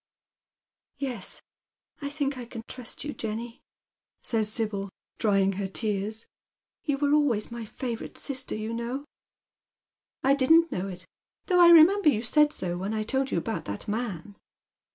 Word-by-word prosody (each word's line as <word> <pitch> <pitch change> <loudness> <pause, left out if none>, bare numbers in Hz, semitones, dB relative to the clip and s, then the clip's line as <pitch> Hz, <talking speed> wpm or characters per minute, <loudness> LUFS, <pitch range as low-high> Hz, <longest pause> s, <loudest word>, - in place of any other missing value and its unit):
" - - -60
Yes, 235 -8 -4 0.6
I 280 - -3
think 285 -1 -2
I 250 -2 -6
can 230 -1 -8
trust 250 -1 -8
you, 295 0 -4
Jenny," 230 +2 -5 0.6
says 220 -3 +1
Sibyl, 210 -3 -1 0.3
drying 195 -3 +3
her 200 -1 -1
tears. 210 +2 -2 0.3
" - - -67
You 285 -3 +1
were 285 +1 +2
always 255 -8 +2
my 235 -1 -5
favourite 235 +1 -5
sister, 265 -2 -4
you 215 +1 -4
know." 240 +5 -3 1.2
"I 270 +1 +5
didn't 325 +5 +5
know 185 +2 -2
it, 185 -1 -8 0.4
though 360 -2 +4
I 345 - +9
remember 340 +2 +8
you 225 -5 +1
said 300 +4 +4
so 175 -9 -3
when 200 +4 -2
I 215 - 0
told 265 +4 0
you - - 0
about 220 +6 -3
that 100 0 -5
man." 205 -4 -3
235 Hz, 160 wpm, -27 LUFS, 210-280 Hz, 1.2 s, I